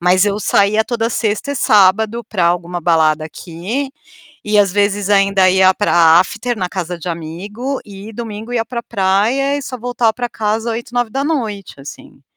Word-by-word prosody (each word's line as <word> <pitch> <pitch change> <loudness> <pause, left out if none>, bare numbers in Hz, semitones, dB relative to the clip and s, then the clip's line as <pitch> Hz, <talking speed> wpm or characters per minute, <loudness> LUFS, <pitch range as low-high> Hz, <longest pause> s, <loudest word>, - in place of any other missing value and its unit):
Mas 180 +2 +4
eu 205 0 0
saía 205 +2 +2
toda 230 -1 -1
sexta 225 +4 -2
e - - -4
sábado 215 +1 +3
para 185 -6 -1
alguma 175 0 -1
balada 155 -2 +2
aqui, 185 - -5 0.5
e 210 0 +2
às 200 -3 +3
vezes 205 0 0
ainda 195 -2 +4
ia 190 0 +5
para 170 -4 +4
after 230 +6 -1
na 180 -2 -2
casa 180 -2 -4
de 170 - -6
amigo 195 - -5
e 205 0 -10
domingo 225 +1 -7
ia 230 -2 0
para 235 +1 -5
praia 220 +9 +1
e 285 - -4
só 255 -1 -6
voltava 240 -1 0
para 245 +2 -4
casa 220 +1 -2
20h, 235 +1 -6
9h 245 - -2
assim. 140 0 -12
205 Hz, 170 wpm, -17 LUFS, 185-235 Hz, 0.5 s, ia